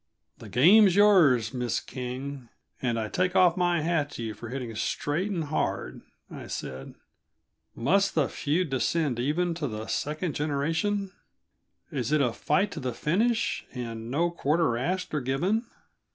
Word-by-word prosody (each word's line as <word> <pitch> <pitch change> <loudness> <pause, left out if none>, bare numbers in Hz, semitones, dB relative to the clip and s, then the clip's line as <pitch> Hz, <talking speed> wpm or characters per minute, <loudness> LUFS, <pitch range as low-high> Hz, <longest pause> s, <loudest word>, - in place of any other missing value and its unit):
"The - - -10
game's 185 - +6
yours, 160 - +5
Miss 125 -2 -1
King, 130 0 -6 0.3
and 120 -3 0
I 110 - -2
take 180 - 0
off 180 -3 +5
my 175 -2 +1
hat 160 -2 0
to 120 - -5
you 110 -1 -4
for 110 +3 -9
hitting 125 -3 -5
straight 150 - -1
and 175 -5 -2
hard," 155 +1 -2 0.3
I - - -9
said. 65 +1 -6 0.8
"Must 195 +11 +2
the 155 -4 +3
feud 155 +2 -1
descend 135 0 0
even 165 +7 0
to 165 -3 -3
the 110 -2 -5
second 155 +5 -2
generation? 165 +8 -1 0.8
Is 135 -4 -2
it 155 - +3
a 125 -5 +1
fight 170 - +1
to - - -6
the 125 -4 -3
finish, 220 +9 0
and 115 -2 -5
no 170 +6 +1
quarter 160 -5 +1
asked 180 +11 -2
or 150 - 0
given?" 180 - 0
150 Hz, 155 wpm, -27 LUFS, 125-180 Hz, 0.8 s, game's